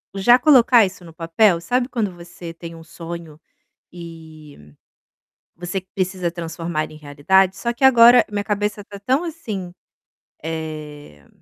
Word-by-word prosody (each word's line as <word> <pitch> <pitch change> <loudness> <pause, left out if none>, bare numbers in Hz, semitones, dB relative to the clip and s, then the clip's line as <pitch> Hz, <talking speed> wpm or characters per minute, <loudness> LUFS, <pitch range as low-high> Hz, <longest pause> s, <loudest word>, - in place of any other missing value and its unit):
já 240 +6 +5
colocar 245 -5 +5
isso 185 -1 -8
no 165 -2 -13
papel, 170 +3 +2
sabe 245 +7 -1
quando 220 -7 -2
você 170 -1 -11
tem 165 0 -10
um 165 - -13
sonho 165 -1 -9 0.5
e 160 - -13 0.8
você 175 +3 -4
precisa 185 -2 -2
transformar 165 -2 -5
em 155 - -13
realidade? 155 +6 +1
Só 235 - -2
que 240 +3 -3
agora 240 -1 +7
minha 205 -1 -3
cabeça 210 0 -3
tá 200 0 -11
tão 265 +8 +1
assim, 220 - -6 0.7
eh, 150 - -8
175 Hz, 135 wpm, -20 LUFS, 160-210 Hz, 0.8 s, agora